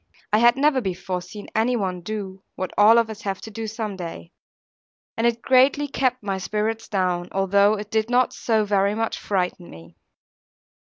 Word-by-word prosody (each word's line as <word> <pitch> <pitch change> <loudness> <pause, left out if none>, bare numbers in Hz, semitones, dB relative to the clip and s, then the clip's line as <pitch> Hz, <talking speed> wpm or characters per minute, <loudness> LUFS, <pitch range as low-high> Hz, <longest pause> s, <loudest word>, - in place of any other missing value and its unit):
I 215 - +5
had 240 +2 +5
never 280 -1 +3
before 185 -2 -3
seen 205 +4 -10
any 230 +3 +1
one 185 -5 -2
do, 195 -1 -6
what 185 - -4
all 215 +3 +6
of 230 -1 +3
us 220 0 -8
have 195 -2 -3
to 220 - -9
do 225 +1 -5
some 215 -2 -4
day; 165 - -8 0.8
and 230 +1 +1
it 235 -1 -1
greatly 270 +3 +4
kept 255 -3 -1
my 195 -2 -2
spirits 215 +3 -2
down, 180 -3 -1
although 200 +2 +3
it 210 0 -8
did 220 +1 0
not 250 0 +2
so 220 -2 0
very 200 0 +1
much 225 0 -2
frighten 180 -3 -2
me. 80 0 -14
210 Hz, 180 wpm, -23 LUFS, 190-230 Hz, 0.8 s, all